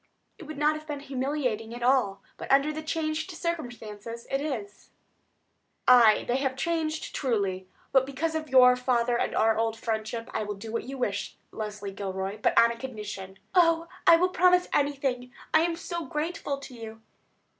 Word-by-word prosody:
"It 345 - -9
would 310 0 -8
not 300 +1 +3
have 310 0 -9
been 290 -2 -4
humiliating 260 -5 -2
at 240 - -6
all; 240 -7 +2
but, - - -6
under 280 +3 +4
the 310 - -4
changed 315 +1 -2
circumstances, 235 - -5
it 270 +1 0
is." 225 -9 -5 1.0
"Aye; 235 -4 +7
they 245 - +1
have 265 -1 -1
changed, 315 +1 -2
truly. 200 -8 -1 0.2
But 265 -1 +4
because 315 +4 -2
of 315 -2 -3
your 250 -1 +7
father 245 -1 +1
and - - -1
our 220 0 +3
old 225 0 0
friendship, 225 +1 -3
I - - -1
will 210 -1 -4
do 220 +3 -8
what 230 - -3
you 270 +2 -6
wish, 205 -6 -3
Leslie 210 -2 -5
Gilroy; 195 +1 -4
but - - +1
on 230 0 +7
a 235 - -6
condition." 210 -6 -7 0.2
"Oh, 335 -2 +4 0.2
I 335 - +10
will 365 +2 +2
promise 360 0 +4
anything, 270 -3 0 0.2
I 315 - +6
am 335 0 0
so 340 -1 -5
grateful 300 -2 -3
to 275 -2 -11
you." 225 -2 -9
255 Hz, 175 wpm, -27 LUFS, 220-310 Hz, 1.0 s, I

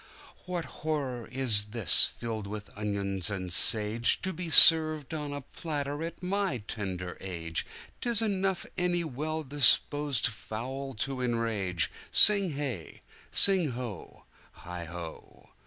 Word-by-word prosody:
"What 175 -2 -5
horror 140 -7 -5
is 120 -5 +3
this, 105 -4 +6
filled 110 -3 -7
with 105 0 -9
onions 100 -3 -3
and 95 -3 -6
sageTo 115 - +4
be 175 0 -6
served 155 -2 +6
on 150 -2 -6
a 145 0 -6
platter 145 0 -6
at 170 +2 -8
my 195 -6 -2
tender 95 -4 -7
age!'Tis 90 - -4
enough 195 -3 -2
any 175 -1 -1
well 155 +2 -5
disposed 145 0 +1
fowl 130 +5 -6
to 130 +4 -5
enrage!" 115 -8 -2 0.2
Sing 200 -6 +5
hey! 135 - -7 0.3
sing 185 -9 +3
ho! 120 -6 -9 0.4
heigho! 85 -1 -10
130 Hz, 115 wpm, -27 LUFS, 105-155 Hz, 0.4 s, this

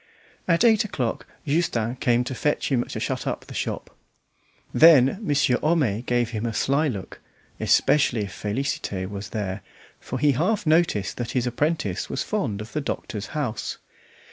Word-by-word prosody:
At 170 +3 +3
eight 220 -3 +5
o'clock 125 - -3 0.2
Justin 135 -7 0
came 120 -1 +2
to 130 - -4
fetch 150 +3 -1
him 125 -3 +2
to - - -6
shut - - -3
up - - -3
the - - -10
shop. - - -4 0.8
Then 155 0 +6
Monsieur 145 - +2
Homais 145 -10 +1
gave 120 -2 +1
him 115 0 -2
a 115 - -4
sly 140 +7 +2
look, 100 -9 -6 0.4
especially 125 -6 +3
if 100 -2 -5
Félicité 105 -4 -3
was 100 +1 -6
there, 100 -3 -3 0.4
for - - -5
he 150 -1 +4
half 180 - 0
noticed 155 - +2
that 120 -1 -4
his 125 -2 +1
apprentice 135 - -1
was - - -2
fond 100 -1 -2
of 110 +2 -9
the 150 - -1
doctor's 105 -6 -4
house. 120 -7 -3
125 Hz, 165 wpm, -24 LUFS, 110-150 Hz, 0.8 s, Then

